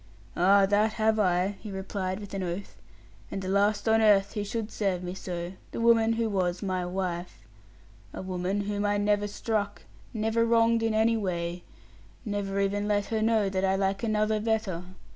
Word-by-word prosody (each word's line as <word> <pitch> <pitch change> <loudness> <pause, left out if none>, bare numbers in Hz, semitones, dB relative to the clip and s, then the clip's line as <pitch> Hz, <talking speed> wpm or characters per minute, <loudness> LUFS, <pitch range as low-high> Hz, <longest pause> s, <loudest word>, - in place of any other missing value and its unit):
'Ah, 195 +2 +5
that 210 +2 +2
have 220 0 +2
I,' 185 0 +1
he 215 - -8
replied 190 0 -3
with 205 -2 -9
an 195 - -2
oath; 180 +2 -5 0.5
'and 195 - -4
the 185 - -5
last 205 +2 +1
on 225 0 +4
earth 200 -2 +4
who 210 - -2
should 215 +1 -4
serve 190 -4 -1
me 180 0 -4
so, 175 -1 -5 0.2
the - - -4
woman 230 -1 +4
who 230 0 0
was 185 -2 -1
my 185 -2 -1
wife. 175 - -4 0.7
A - - -7
woman 185 +2 -2
whom 205 0 -2
I 205 0 +1
never 205 0 +1
struck, 205 0 -2 0.3
never 225 0 +1
wronged 230 0 +3
in 225 -1 0
any 225 +1 +3
way, 175 -3 -3 0.6
never 200 -2 -2
even 200 +1 0
let 205 -1 +1
her 220 - +1
know 220 -2 +2
that 190 0 -1
I 190 0 +2
like 195 0 0
another 215 -1 +1
better. 215 -5 -1
205 Hz, 180 wpm, -28 LUFS, 190-215 Hz, 0.7 s, Ah